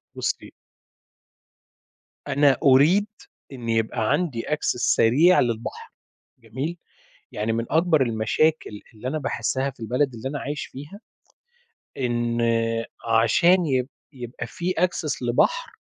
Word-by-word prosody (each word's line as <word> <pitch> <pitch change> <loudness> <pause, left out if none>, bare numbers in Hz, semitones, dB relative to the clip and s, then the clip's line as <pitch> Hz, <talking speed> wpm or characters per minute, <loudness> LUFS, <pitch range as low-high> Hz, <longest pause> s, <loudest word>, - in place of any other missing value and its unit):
بُصي - - -3 1.7
أنا 140 -1 +3
أريد 150 +10 +5 0.4
إن 120 -3 -7
يبقى 110 0 0
عندي 145 -6 0
Access 150 - -1 0.2
سريع 145 +11 +4
للبحر، 120 +1 -3 0.5
جميل، 130 +9 -5 0.5
يعني 110 +2 -2
من 115 +1 -2
أكبر 160 -2 +3
المشاكل 115 +1 0
اللي 110 +4 -7
أنا 155 +4 -2
باحسها 135 -1 -1
في 135 - -15
البلد 125 +4 -1
اللي 115 +4 -5
أنا 145 - -4
عايش 145 +2 -4
فيها 145 +10 -11 1.0
إن 120 -2 -1 0.8
عشان 175 +7 +4
يب 130 -2 0 0.2
يبقى 120 -2 -7
في 175 +8 -3
Access 165 -6 -1
لبحر - - +1
135 Hz, 115 wpm, -24 LUFS, 115-155 Hz, 1.7 s, أريد